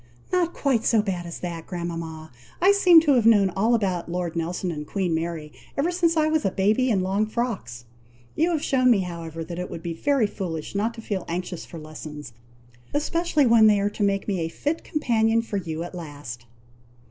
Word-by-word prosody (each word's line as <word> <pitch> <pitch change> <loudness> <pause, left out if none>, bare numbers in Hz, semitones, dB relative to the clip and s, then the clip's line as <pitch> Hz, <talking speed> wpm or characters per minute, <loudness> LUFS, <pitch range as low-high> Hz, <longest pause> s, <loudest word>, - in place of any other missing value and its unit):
"Not 350 -2 +1
quite 260 -6 +1
so 225 - +3
bad 180 -4 -3
as 170 - -7
that, 170 -2 -5
grandmama! 165 -3 -5 0.3
I 380 +3 +6
seem 360 -5 +7
to 305 -3 +2
have 235 -3 +4
known 205 -4 +5
all 220 +6 +2
about 185 -6 -1
Lord 175 -1 -3
Nelson 175 +2 -2
and 150 -2 -6
Queen 185 -4 -1
Mary, 160 -2 -3 0.3
ever 310 +6 +1
since 340 -2 +1
I 310 0 +3
was 310 0 +1
a 195 - +2
baby 215 +7 +2
in 200 -5 +2
long 195 +3 0
frocks! 215 - -4 0.5
You 330 +3 +2
have 320 -4 -1
shewn 255 -2 +3
me, 220 -5 +4
however, 165 -2 -6
that 170 +1 -6
it 180 - -4
would 165 - -7
be 170 -1 -3
very 275 - +2
foolish 170 -6 -5
not 220 +4 -1
to 225 - -8
feel 195 -5 -3
anxious 175 0 -4
for 170 - -9
lessons, 155 -3 -9 0.6
especially 310 0 +1
when 230 -2 +6
they 210 -1 +4
are 200 +1 0
to 210 - -7
make 200 -1 +1
me 195 -3 0
a 165 -1 -2
fit 300 - -3
companion 230 -6 +1
for 210 -3 -3
you 165 -3 -4
at 175 - -8
last." 145 -8 -8
195 Hz, 205 wpm, -24 LUFS, 170-240 Hz, 0.6 s, seem